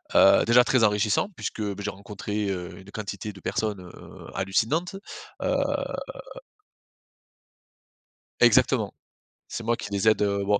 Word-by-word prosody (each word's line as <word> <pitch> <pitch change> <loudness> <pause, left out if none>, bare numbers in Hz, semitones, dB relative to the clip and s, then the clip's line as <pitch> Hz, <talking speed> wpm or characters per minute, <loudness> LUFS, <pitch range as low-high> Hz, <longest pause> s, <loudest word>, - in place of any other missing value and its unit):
heu, - - +7
déjà 120 +1 +6
très 125 -1 +2
enrichissant 105 - +2
puisque, 110 - -5
beh, 100 -1 -3
j'ai 105 - -2
rencontré, 100 +1 -4
heu, 90 -2 -4
une 95 +2 -14
quantité 105 0 -5
de 95 - -13
personnes, 105 -2 -2
heu, 90 - -12
hallucinantes, 120 - 0 0.5
heu - - +1 2.9
Exactement. - - +4 0.6
C'est 115 - -5
moi 115 +1 +1
qui - - -6
les 100 +2 +3
aide, 110 - +2
heu, 100 -1 0
bon, 100 0 +2
105 Hz, 135 wpm, -26 LUFS, 100-110 Hz, 2.9 s, heu